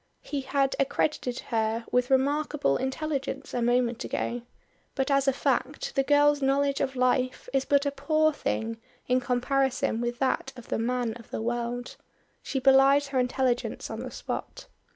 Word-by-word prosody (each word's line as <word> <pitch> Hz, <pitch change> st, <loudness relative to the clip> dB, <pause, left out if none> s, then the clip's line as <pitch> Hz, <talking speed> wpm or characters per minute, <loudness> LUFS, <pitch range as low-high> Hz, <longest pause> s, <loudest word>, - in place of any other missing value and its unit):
He 285 Hz, -2 st, -3 dB
had 270 Hz, 0 st, 0 dB
accredited 270 Hz, -2 st, 0 dB
her 225 Hz, 0 st, 0 dB
with 250 Hz, 0 st, +2 dB
remarkable 280 Hz, -, +2 dB
intelligence 275 Hz, -, -3 dB
a 245 Hz, -, -1 dB
moment 240 Hz, 0 st, +1 dB
ago, 240 Hz, 0 st, -2 dB, 0.5 s
but 270 Hz, +1 st, 0 dB
as 275 Hz, 0 st, +3 dB
a -, -, +6 dB
fact -, -, -1 dB
the 275 Hz, -, +3 dB
girl's 290 Hz, +1 st, +4 dB
knowledge 275 Hz, +1 st, +1 dB
of 270 Hz, -1 st, -1 dB
life 255 Hz, 0 st, +1 dB
is 270 Hz, -1 st, +1 dB
but 285 Hz, 0 st, +3 dB
a 285 Hz, -, +1 dB
poor 310 Hz, +3 st, +2 dB
thing 225 Hz, -4 st, -3 dB, 0.3 s
in 255 Hz, 0 st, +3 dB
comparison 250 Hz, -1 st, 0 dB
with 240 Hz, 0 st, -2 dB
that 265 Hz, +1 st, 0 dB
of 245 Hz, -2 st, -12 dB
the -, -, -1 dB
man 240 Hz, 0 st, -1 dB
of 230 Hz, -, -15 dB
the -, -, -4 dB
world. 240 Hz, +1 st, -3 dB, 0.4 s
She -, -, -4 dB
belies 275 Hz, +1 st, +5 dB
her 265 Hz, -2 st, 0 dB
intelligence 250 Hz, 0 st, -1 dB
on -, -, -5 dB
the -, -, -5 dB
spot. -, -, -6 dB
265 Hz, 165 wpm, -27 LUFS, 245-280 Hz, 0.5 s, a